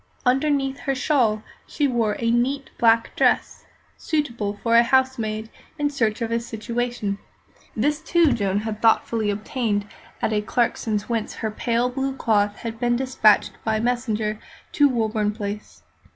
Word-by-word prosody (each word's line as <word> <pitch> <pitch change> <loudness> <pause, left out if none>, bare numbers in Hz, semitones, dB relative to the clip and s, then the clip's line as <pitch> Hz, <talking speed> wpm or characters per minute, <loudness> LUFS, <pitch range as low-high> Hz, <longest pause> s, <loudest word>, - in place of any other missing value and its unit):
Underneath 270 +1 +1
her 275 - -1
shawl 245 -7 +1 0.2
she 295 -2 0
wore 230 -5 0
a 230 -1 0
neat 265 +4 0
black 230 -1 +3
dress, - - +1 0.3
suitable 235 -10 -2
for 230 0 +3
a 235 - +8
housemaid 235 -4 0 0.3
in 290 -1 0
search 230 -4 0
of 230 - -3
a 230 - +1
situation. 235 -2 -3 0.6
This, 295 +7 0
too, 335 -2 +3
Joan 200 -2 0
had 215 -1 -5
thoughtfully 225 -1 +2
obtained 210 0 -1 0.3
at 220 - 0
Clarkson's, 220 -3 0
whence 230 -2 -2
her 220 - -3
pale 235 +3 0
blue 270 +1 -2
cloth 205 -5 +1
had 225 -1 -6
been 240 -1 +2
despatched 250 -5 +3
by 220 -1 0
messenger 220 -3 -1 0.3
to 290 -1 +4
Woburn 220 -3 0
Place. 205 -1 -6
230 Hz, 145 wpm, -23 LUFS, 215-260 Hz, 0.6 s, a